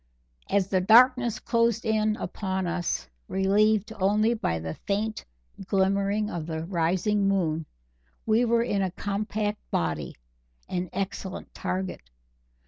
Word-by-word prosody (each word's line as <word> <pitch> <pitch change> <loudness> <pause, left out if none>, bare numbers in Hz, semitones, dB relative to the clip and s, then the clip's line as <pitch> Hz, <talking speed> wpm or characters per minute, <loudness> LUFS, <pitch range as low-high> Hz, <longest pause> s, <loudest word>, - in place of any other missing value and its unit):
As 195 -2 +2
the 185 -2 +2
darkness 245 +3 +5
closed 230 -1 +1
in 215 -1 +2
upon 190 -3 -3
us, 175 - -2 0.2
relieved 210 +3 +2
only 210 +4 +3
by 215 - -1
the 80 0 -4
faint 215 +2 -2 0.4
glimmering 200 +2 +1
of 170 -6 -5
the 160 -1 -3
rising 185 +4 +1
moon, 165 -5 0 0.6
we 225 +2 +3
were 235 -1 +3
in 205 -4 0
a 190 - +1
compact 205 +2 -2
body 80 -4 -2 0.5
an 180 0 -3
excellent 190 0 -5
target. 185 0 -3
200 Hz, 125 wpm, -27 LUFS, 185-215 Hz, 0.6 s, darkness